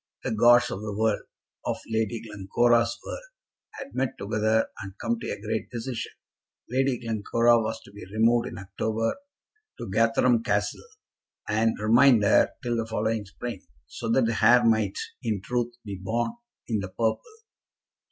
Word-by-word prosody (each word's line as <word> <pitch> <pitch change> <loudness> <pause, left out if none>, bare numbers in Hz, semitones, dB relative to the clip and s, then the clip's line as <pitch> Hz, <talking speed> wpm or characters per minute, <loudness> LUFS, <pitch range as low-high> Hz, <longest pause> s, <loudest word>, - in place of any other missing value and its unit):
The - - -2
gods 120 +2 +5
of 95 - -4
the 105 -1 -5
world, 110 -1 +1 0.4
of - - -1
Lady 110 0 -1
Glencora's 115 +3 +1
world, - - -5 0.5
had 275 -1 -9
met 130 -1 -1
together 110 +2 +1
and 95 0 -9
come 235 -1 -1
to - - -5
a - - -4
great 110 +1 -3
decision. 120 0 -5 0.6
Lady 130 0 +1
Glencora 115 +1 +2
was 110 0 -3
to - - -15
be 105 +1 -11
removed 115 +2 +3
in - - -7
October 110 +3 -2 0.6
to - - -6
Gatherum 115 +2 +3
Castle, 105 -1 0 0.7
and 110 +1 +1
remain 115 +4 +5
there 100 - +3
till 120 -1 -1
the 115 -1 -2
following 110 -1 -1
spring, 100 +1 -7 0.2
so 115 - -6
that 120 +1 +3
the 115 -1 -1
heir 120 0 +7
might, 110 -4 +2 0.2
in 110 -6 -1
truth, 120 +3 -2
be 100 -2 -6
born 115 - -1 0.4
in 110 -3 0
the 95 -1 -5
purple. 110 +4 0
115 Hz, 160 wpm, -26 LUFS, 105-120 Hz, 0.7 s, heir